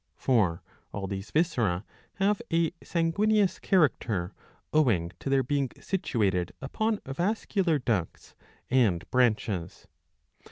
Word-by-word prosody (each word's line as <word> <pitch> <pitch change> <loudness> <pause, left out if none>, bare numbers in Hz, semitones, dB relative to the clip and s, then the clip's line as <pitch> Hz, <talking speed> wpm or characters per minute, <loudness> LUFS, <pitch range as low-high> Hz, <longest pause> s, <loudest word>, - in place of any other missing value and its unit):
For 105 -10 +1 0.3
all 100 -1 -4
these 95 +1 -5
viscera 115 - +1 0.3
have 205 +3 +1
a 165 -1 +2
sanguineous 200 +4 +1
character 115 - +1 0.4
owing 110 - +2
to - - -4
their 135 -1 +3
being 140 0 0
situated 100 - 0
upon 215 +10 -1
vascular 175 +2 0
ducts 110 - -2 0.4
and 105 -10 +2
branches. 105 -8 0
130 Hz, 105 wpm, -28 LUFS, -, 0.4 s, their